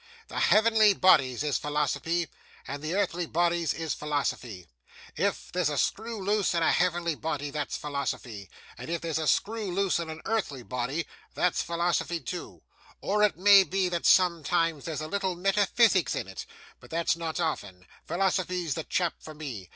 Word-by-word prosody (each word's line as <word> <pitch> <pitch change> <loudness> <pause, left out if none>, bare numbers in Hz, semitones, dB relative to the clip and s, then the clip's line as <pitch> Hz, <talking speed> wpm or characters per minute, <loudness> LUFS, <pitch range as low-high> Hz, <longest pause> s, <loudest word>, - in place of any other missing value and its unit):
The - - -4
heavenly 215 -2 +5
bodies 135 -9 +4
is 150 -2 0
philosophy, 150 +3 -1 0.4
and 140 +1 -5
the 155 +4 -3
earthly 175 -4 0
bodies 170 -1 +1
is 165 -1 -3
philosophy. 130 - -3 0.5
If - - -1
there's 180 -4 +1
a 145 - -3
screw 225 - -1
loose 205 -3 +1
in 170 - +2
a - - +4
heavenly 175 -2 +1
body, 145 -2 -4
that's 150 -1 -3
philosophy; 125 -8 -4 0.3
and - - -7
if 170 0 -2
there's 160 -1 -2
screw 215 -2 0
loose 195 -1 +1
in 165 -1 -4
a 155 - -6
earthly 190 - -2
body, 125 +7 -3 0.3
that's 180 - +1
philosophy 170 0 -1
too; 175 +1 -7 0.4
or 210 +2 0
it 210 -4 +3
may 200 +2 +8
be 190 0 0
that 170 -1 -1
sometimes 165 -3 +3
there's 155 -3 -3
a 155 - -4
little 190 0 -1
metaphysics 195 +1 +3
in - - -3
it, 95 -1 -8 0.3
but - - -16
that's 165 0 +1
not 165 -1 -4
often. 95 - -3 0.2
Philosophy's 180 -2 0
the 160 - -4
chap 175 +1 0
for 155 - -11
me. 125 - -7
170 Hz, 165 wpm, -28 LUFS, 150-185 Hz, 0.5 s, may